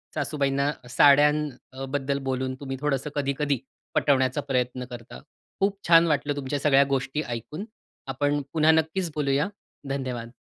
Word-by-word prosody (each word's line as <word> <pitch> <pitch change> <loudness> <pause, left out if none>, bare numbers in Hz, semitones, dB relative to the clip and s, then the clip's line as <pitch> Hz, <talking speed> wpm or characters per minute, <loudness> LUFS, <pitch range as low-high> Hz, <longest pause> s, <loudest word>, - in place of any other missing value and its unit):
सासूबाईंना 140 -1 0 0.2
साड्यांबद्दल 140 -1 +2
बोलून 130 0 -2
तुम्ही 135 -2 -5
थोडंसं 145 0 -1
कधी-कधी 140 -1 0 0.4
पटवण्याचा 130 0 +2
प्रयत्न 125 -2 -2
करता. 120 0 -9 0.4
खूप 195 0 +1
छान 165 0 +7
वाटलं 145 -1 0
तुमच्या 140 0 -3
सगळ्या 140 -1 +5
गोष्टी 135 +2 -1
ऐकून. 120 - -5 0.4
आपण 145 +2 0
पुन्हा 160 0 +5
नक्कीच 160 +2 0
बोलूया. 145 +3 +1 0.4
धन्यवाद. 125 -3 -4
140 Hz, 120 wpm, -26 LUFS, 130-150 Hz, 0.4 s, छान